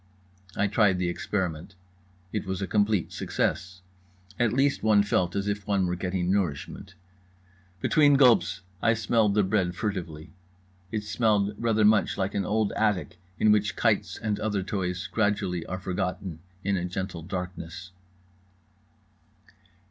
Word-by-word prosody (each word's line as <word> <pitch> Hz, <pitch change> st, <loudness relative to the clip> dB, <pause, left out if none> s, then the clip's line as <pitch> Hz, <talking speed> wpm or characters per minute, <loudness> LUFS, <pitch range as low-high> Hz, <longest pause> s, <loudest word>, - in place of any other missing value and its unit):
I 105 Hz, -, +1 dB
tried 100 Hz, -2 st, +3 dB
the 90 Hz, -1 st, 0 dB
experiment. 90 Hz, -1 st, -3 dB, 0.6 s
It 105 Hz, -2 st, -3 dB
was 95 Hz, -1 st, -2 dB
a 95 Hz, -, -1 dB
complete 105 Hz, -2 st, +1 dB
success. 90 Hz, 0 st, -2 dB, 0.6 s
At 120 Hz, -3 st, +3 dB
least 135 Hz, +3 st, +2 dB
one 105 Hz, -2 st, +4 dB
felt 90 Hz, -3 st, 0 dB
as 100 Hz, 0 st, -1 dB
if 105 Hz, 0 st, -3 dB
one 100 Hz, -2 st, +2 dB
were 90 Hz, 0 st, -1 dB
getting 90 Hz, 0 st, -1 dB
nourishment. 95 Hz, +1 st, -2 dB, 0.9 s
Between 145 Hz, -2 st, +4 dB
gulps 125 Hz, -8 st, +4 dB, 0.2 s
I 115 Hz, -, +3 dB
smelled 110 Hz, -1 st, +2 dB
the 105 Hz, -, +4 dB
bread 95 Hz, -2 st, 0 dB
furtively. 90 Hz, -6 st, -4 dB, 0.6 s
It 110 Hz, -2 st, -2 dB
smelled 105 Hz, -1 st, +1 dB
rather 110 Hz, -1 st, +2 dB
much 105 Hz, 0 st, +3 dB
like 95 Hz, 0 st, -1 dB
an 100 Hz, -2 st, -1 dB
old 110 Hz, 0 st, +1 dB
attic 90 Hz, -6 st, -1 dB, 0.2 s
in 110 Hz, -, +4 dB
which 105 Hz, -1 st, +2 dB
kites -, -, +1 dB
and 105 Hz, -2 st, -2 dB
other 105 Hz, -3 st, -1 dB
toys 90 Hz, -2 st, -3 dB
gradually 100 Hz, -5 st, -1 dB
are 95 Hz, -, -3 dB
forgotten 90 Hz, -2 st, -3 dB, 0.2 s
in 100 Hz, 0 st, +1 dB
a 90 Hz, -, -2 dB
gentle 90 Hz, -1 st, -4 dB
darkness. 90 Hz, 0 st, -6 dB
100 Hz, 140 wpm, -27 LUFS, 90-105 Hz, 0.9 s, one